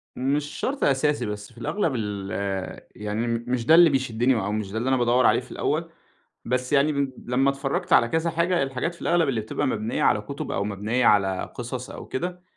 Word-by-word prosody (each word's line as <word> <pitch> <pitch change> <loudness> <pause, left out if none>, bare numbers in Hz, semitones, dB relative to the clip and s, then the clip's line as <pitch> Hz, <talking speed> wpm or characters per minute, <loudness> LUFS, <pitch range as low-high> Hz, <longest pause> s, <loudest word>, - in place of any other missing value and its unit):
مش 140 +3 0
شرط 275 +2 -2
أساسي، 145 +2 +2
بس 105 +1 -6
في - - -24
الأغلب 155 - -1
ال 100 -3 -4 0.6
يعني 105 +3 -3
م 115 0 -1
مش 125 -2 -1
ده 160 - +7
اللي 170 0 +8
بيشدني 130 -2 +1
أو 105 -2 -1
مش 105 -2 -3
ده 110 - -4
اللي 120 +4 -1
أنا 130 - +3
بادوّر 120 +1 +3
عليه - - +5
في - - -12
الأول، - - -1 0.6
بس 125 +3 -1
يعني 145 +2 +4
م 140 -2 -1
لمّا 130 +3 +2
اتفرجت 140 0 -1
على 115 - +6
كذا 160 +1 0
حاجة، 170 0 +1
الحاجات 135 +6 -3
في - - -18
الأغلب 170 -3 +2
اللي 120 -5 0
بتبقى 110 - -2
مبنية 110 -2 -1
على - - +3
كتب - - -6
أو 100 - -1
مبنية 105 +5 -1
على 95 -3 +2
قصص 125 +1 -5
أو - - -8
كده 180 +5 -4
125 Hz, 210 wpm, -25 LUFS, 110-140 Hz, 0.6 s, اللي